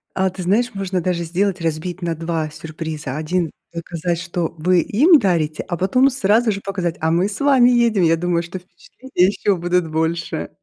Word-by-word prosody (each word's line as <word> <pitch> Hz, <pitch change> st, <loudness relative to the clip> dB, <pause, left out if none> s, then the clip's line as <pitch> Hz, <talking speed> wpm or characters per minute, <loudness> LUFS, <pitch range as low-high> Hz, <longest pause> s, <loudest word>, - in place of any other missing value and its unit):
А 190 Hz, 0 st, +1 dB
ты 185 Hz, +1 st, -8 dB
знаешь, 215 Hz, +7 st, +1 dB
можно 190 Hz, -2 st, -2 dB
даже 170 Hz, 0 st, -1 dB
сделать 185 Hz, +2 st, -1 dB
разбить 165 Hz, +3 st, -3 dB
на 170 Hz, -1 st, -2 dB
2 165 Hz, -1 st, -3 dB
сюрприза. 155 Hz, -3 st, -6 dB
1 165 Hz, +1 st, -1 dB, 0.2 s
показать, 170 Hz, 0 st, -3 dB
что 175 Hz, -1 st, -3 dB
вы 180 Hz, +3 st, +3 dB
им 300 Hz, -, +5 dB
дарите, 165 Hz, -, 0 dB
а 175 Hz, -, -3 dB
потом 255 Hz, +10 st, +3 dB
сразу 225 Hz, -2 st, +2 dB
же 200 Hz, -1 st, -4 dB
показать: 180 Hz, -4 st, -3 dB
"А 160 Hz, 0 st, +1 dB
мы 180 Hz, +4 st, +2 dB
с 205 Hz, -, -6 dB
вами 270 Hz, -4 st, +5 dB
едем". 235 Hz, -5 st, +3 dB
Я 165 Hz, 0 st, +4 dB
думаю, 175 Hz, 0 st, 0 dB
что 180 Hz, +2 st, -7 dB
впечатления 185 Hz, +2 st, -2 dB
еще 200 Hz, 0 st, 0 dB
будут 175 Hz, -1 st, 0 dB
больше. 160 Hz, +1 st, -2 dB
180 Hz, 185 wpm, -20 LUFS, 165-200 Hz, 0.2 s, им